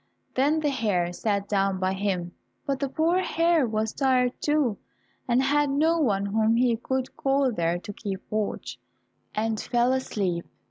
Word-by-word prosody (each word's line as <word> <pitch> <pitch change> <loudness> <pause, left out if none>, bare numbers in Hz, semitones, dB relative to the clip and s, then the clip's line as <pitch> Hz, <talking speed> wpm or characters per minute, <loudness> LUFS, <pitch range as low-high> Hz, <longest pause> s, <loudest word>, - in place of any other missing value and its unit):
Then 290 +4 +2
the 295 -2 +1
hare 195 -9 0
sat 200 +1 -1
down 195 -2 +1
by 185 0 0
him, 190 -3 -2 0.3
but 275 -2 -1
the 275 - -1
poor 325 +6 +2
hare 335 -5 +2
was 220 0 -1
tired 255 -2 +2
too, 295 -8 +1 0.5
and 250 +1 +3
had 290 +1 +2
no 320 +4 +2
one 200 -9 +1
whom 220 +2 +2
he 240 -1 +3
could 260 +3 -3
call 270 -1 +1
there 170 -5 0
to 205 +3 -8
keep 195 -2 -5
watch, 215 -1 -3 0.6
and 220 0 0
fell 240 +1 +2
asleep. 195 -9 -2
235 Hz, 165 wpm, -26 LUFS, 200-275 Hz, 0.6 s, and